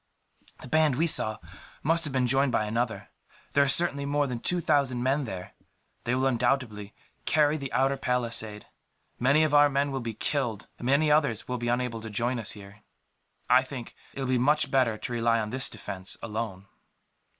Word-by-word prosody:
"The - - -9
band 155 -1 +3
we 160 +6 +2
saw 110 -9 +3 0.5
must 165 +3 +2
have 150 - -2
been 130 -1 +1
joined 135 +2 +2
by 110 -3 +1
another. 110 -2 -2 0.4
There 140 - +5
are - - 0
certainly 140 -3 +3
more 145 0 +1
than 125 -3 -4
two 180 +8 +2
thousand 135 -6 +1
men 135 +2 +1
there. 95 -5 -7 0.5
They 120 - +1
will 130 +1 0
undoubtedly 120 -5 -1 0.3
carry 150 -1 +3
the 140 -4 -5
outer 135 +2 +1
palisade. 115 -5 -2 0.5
Many 140 +5 +4
of 155 -2 0
our 145 0 +6
men 140 0 0
will 135 - -2
be 115 -3 -5
killed, 120 -7 -2
and 120 - -4
many 145 +3 +3
others 140 -8 +1
will 125 -1 -3
be 120 - -3
unable 120 -1 -1
to 110 - -7
join 120 +4 -1
us 110 - -1
here. 100 0 -13 0.7
I 125 +1 +6
think 130 -2 -8 0.2
that - - -15
it - - -3
will 130 - -2
be 130 -1 +2
much 145 +2 +2
better 125 -5 +2
to 120 - -5
rely 115 0 +2
on 105 -1 -3
this 130 +1 +2
defence, 95 -2 -5
alone." 110 -4 -4
125 Hz, 195 wpm, -27 LUFS, 115-140 Hz, 0.7 s, our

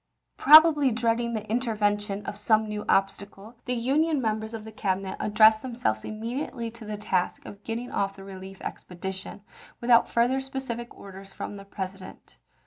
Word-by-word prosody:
Probably 300 -1 +7
dreading 235 +1 0
the 215 0 -5
intervention 210 -3 -1
of - - -5
some 215 +1 +2
new 210 0 -4
obstacle, 200 +2 -1
the 250 - -1
Union 290 +6 +1
members 220 -2 -2
of 220 -1 -8
the 220 - -9
Cabinet 195 -3 -2
ad 210 - -3
dressed 220 0 +7
themselves 235 - -2
immediately 230 +2 -4
to 230 -1 -12
the 210 0 -5
task 190 -3 -1
of 205 0 -11
getting 235 +2 -5
off 195 0 -1
the 195 - -11
relief 190 0 -10
expedition, 190 +2 -7 0.4
without 235 -1 +4
further 245 +3 +2
specific 265 -3 -5
orders 195 0 -11
from 205 - -6
the 200 0 -10
President. 190 -1 -8
215 Hz, 160 wpm, -26 LUFS, 195-235 Hz, 0.4 s, Probably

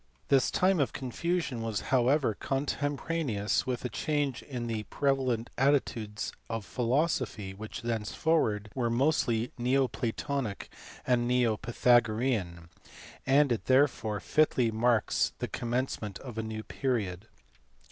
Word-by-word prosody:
This 135 -2 +4
time 185 -1 +2
of 140 - +1
confusion 140 0 -2
was 115 -2 -2
however 130 0 +3
contempo 140 +4 -2
raneous 130 -14 0
with 125 -1 -2
a - - -1
change 145 +1 -1
in 125 -4 -5
the 115 -2 -2
prevalent 130 -4 0
views 120 -6 0 0.2
of 115 -3 -3
philosophy 125 - -1
which 110 +4 -8
thenceforward 110 -1 0
were 120 -3 0
mostly 120 -2 +1
neo 130 +2 +2
platonic 125 -2 -3 0.4
or 125 -1 +4
neo 120 -2 +2
pytha 120 +2 +4
gorean, 110 -8 -2 0.6
and 140 0 +4
it 115 - -1
therefore 130 -6 +2
fitly 125 - +2
marks 115 0 +2
the - - -3
commencement 120 -4 -3
of 120 -4 -7
a - - +1
new 110 0 -5
period. 110 -8 -2
120 Hz, 125 wpm, -30 LUFS, 110-135 Hz, 0.6 s, This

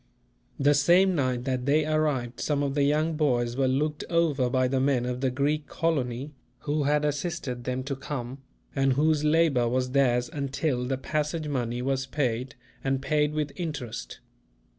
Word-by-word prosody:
The 145 +1 +4
same 175 +6 +4
night 130 -6 0
that 130 -1 -2
they 150 +2 +3
arrived, 150 -6 0
some 145 -1 0
of 140 -1 -1
the 145 - +1
young 155 +3 +2
boys 120 -6 +1
were 135 0 +2
looked 150 +3 0
over 155 -7 +2
by 130 0 +2
the 130 +1 0
men 130 -2 +2
of 125 0 -3
the 135 - +2
Greek 145 +4 -1
colony, 140 -4 -1 0.3
who 145 0 -1
had 150 +1 +2
assisted 145 -5 -3
them 130 0 -2
to 140 +1 -3
come, 135 -1 -5 0.4
and 135 -1 +3
whose 150 +2 +2
labour 150 -6 +3
was 125 +1 0
theirs 125 -3 +2
until 140 -2 -1
the 135 0 -1
passage 150 +3 -2
money 125 -3 -2
was 135 0 -1
paid, 130 -2 -2 0.3
and 135 0 0
paid 150 +1 +1
with 150 -2 -1
interest. 140 -9 -5
140 Hz, 170 wpm, -27 LUFS, 125-150 Hz, 0.4 s, The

